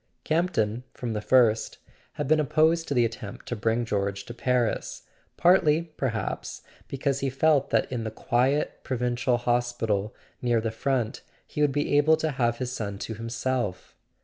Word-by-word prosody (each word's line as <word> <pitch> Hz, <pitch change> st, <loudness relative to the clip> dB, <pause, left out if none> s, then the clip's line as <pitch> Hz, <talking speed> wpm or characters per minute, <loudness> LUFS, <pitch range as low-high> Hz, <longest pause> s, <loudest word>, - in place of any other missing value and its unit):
Campton, 125 Hz, -9 st, 0 dB
from 120 Hz, -3 st, -4 dB
the 105 Hz, -, -2 dB
first, 115 Hz, -2 st, +3 dB, 0.4 s
had 145 Hz, -, -3 dB
been 155 Hz, +2 st, +4 dB
opposed 160 Hz, +3 st, +2 dB
to 140 Hz, -, -1 dB
the 120 Hz, -1 st, +4 dB
attempt 110 Hz, -2 st, -6 dB
to 120 Hz, -, -3 dB
bring 115 Hz, +2 st, 0 dB
George 100 Hz, -2 st, -2 dB
to 120 Hz, -, -8 dB
Paris; 125 Hz, -1 st, -1 dB, 0.3 s
partly 170 Hz, -3 st, +4 dB
perhaps 115 Hz, -5 st, -3 dB, 0.3 s
be¬ 135 Hz, -, -5 dB
cause 135 Hz, 0 st, 0 dB
he 135 Hz, -, 0 dB
felt 140 Hz, +1 st, +2 dB
that -, -, +1 dB
in 120 Hz, -3 st, -2 dB
the 110 Hz, -, -2 dB
quiet 130 Hz, +6 st, 0 dB
provincial 125 Hz, 0 st, 0 dB
hospital 120 Hz, -4 st, 0 dB, 0.3 s
near 120 Hz, -2 st, +2 dB
the 110 Hz, 0 st, -2 dB
front 125 Hz, 0 st, -1 dB, 0.2 s
he 150 Hz, -, -4 dB
would 145 Hz, -1 st, +4 dB
be 145 Hz, +1 st, 0 dB
able 155 Hz, +2 st, +5 dB
to 160 Hz, -1 st, -1 dB
have 120 Hz, -3 st, 0 dB
his 125 Hz, 0 st, -3 dB
son 100 Hz, -5 st, -4 dB
to 110 Hz, -, -5 dB
himself. 115 Hz, -3 st, -3 dB
125 Hz, 170 wpm, -26 LUFS, 115-140 Hz, 0.4 s, able